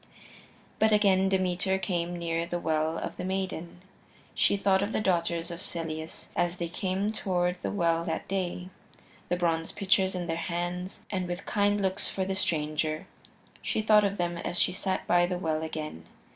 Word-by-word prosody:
But 220 0 +5
again 195 -2 +4
Demeter 190 +1 +1
came 175 -2 -2
near 170 0 -1
the 175 - -1
Well 160 -1 0
of - - -4
the - - -4
Maiden. 185 -2 -3 0.5
She 200 - +3
thought 195 -1 +3
of 205 +2 -1
the - - +1
daughters 170 -3 +1
of 170 +1 -6
Celeus 160 -1 -5
as 175 +1 +1
they 170 -1 -2
came 190 +3 -1
toward 180 -4 0
the - - -1
well 170 -4 +1
that 160 - -3
day, 180 -1 -2 0.6
the 175 - +2
bronze 165 -2 0
pitchers 190 -2 +2
in 180 -1 -2
their 165 -1 -1
hands, 175 +2 -3
and 185 -3 -1
with 175 +1 -4
kind 205 0 +2
looks 190 -1 0
for 190 - -1
the 195 - -1
stranger 155 -4 0 0.6
she 215 - -1
thought 215 -1 +6
of 200 0 0
them 175 -1 -1
as 175 - -2
she 180 - +3
sat 190 0 -1
by 175 0 +4
the 180 0 -1
well 160 -3 -1
again. 155 - -5
180 Hz, 180 wpm, -29 LUFS, 170-190 Hz, 0.6 s, thought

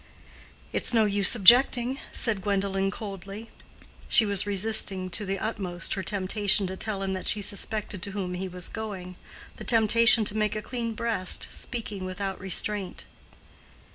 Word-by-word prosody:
"It's 240 - 0
no 220 -1 +3
use 205 +2 +2
objecting," 245 +4 +5
said 215 -5 -1
Gwendolen, 195 0 -1
coldly. 200 +1 -9 0.6
She 225 - +8
was 200 -1 +2
resisting 195 -2 +1
to 200 +3 -2
the 195 +1 -2
utmost 190 -5 -4
her 195 - -4
temptation 200 +2 +2
to 190 0 -6
tell 200 0 -4
him 190 0 -3
that 185 - -5
she 210 - +2
suspected 205 0 -3
to 200 +1 -6
whom 190 -3 -5
he 185 +1 -5
was 180 -1 -5
going—the 190 -5 -10
temptation 225 -1 +4
to 205 - -2
make 215 -1 -1
a 215 - -4
clean 235 -3 -5
breast, 220 -5 0
speaking 215 -5 -5
without 190 +1 -5
restraint. 195 +1 +1
200 Hz, 150 wpm, -25 LUFS, 190-220 Hz, 0.6 s, She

